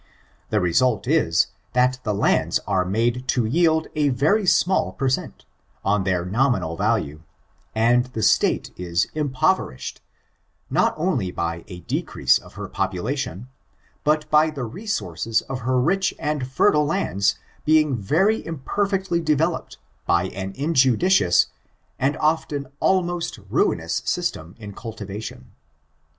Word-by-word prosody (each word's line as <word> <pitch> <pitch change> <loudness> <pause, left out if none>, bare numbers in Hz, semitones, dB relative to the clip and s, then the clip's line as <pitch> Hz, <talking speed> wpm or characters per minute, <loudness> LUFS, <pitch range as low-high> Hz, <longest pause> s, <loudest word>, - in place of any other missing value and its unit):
The 105 - +2
result 110 +6 +2
is, 140 - +3 0.3
that 125 +1 +2
the 110 - -2
lands 100 - +2
are 95 -2 +1
made 115 +6 0
to 125 -4 +1
yield 160 +5 +2
a 150 -2 +2
very 155 - +2
small 175 - +2
per 135 +7 -1
cent, 130 - -2 0.4
on 100 -1 +1
their 90 -2 0
nominal 110 -5 +1
value, 75 -2 -1 0.5
and 120 +2 +3
the 115 -4 -4
state - - +2
is 90 +1 0
impoverished, 150 - -1 0.7
not - - +2
only 155 - 0
by 85 -1 -3
a 90 -3 -9
decrease 65 -5 +1
of - - -16
her - - -6
population, 125 +3 -3 0.6
but 155 0 +1
by 155 +1 +5
the 145 -4 -5
resources 115 - -2
of 135 -1 -5
her 130 +1 +1
rich 185 +8 +1
and 150 -4 -2
fertile 150 +3 +3
lands 150 - +1 0.3
being 155 -3 +3
very 165 - +1
imperfectly 190 +4 -1
developed 160 +2 0 0.3
by 85 +2 +2
an 95 0 -5
injudicious 135 - +3 0.5
and 135 +3 +1
often 150 -2 0
almost 175 -4 0
ruinous - - +1
system 80 +5 -2
in 105 -3 -9
cultivation. 105 - -8
130 Hz, 130 wpm, -23 LUFS, 100-155 Hz, 0.7 s, by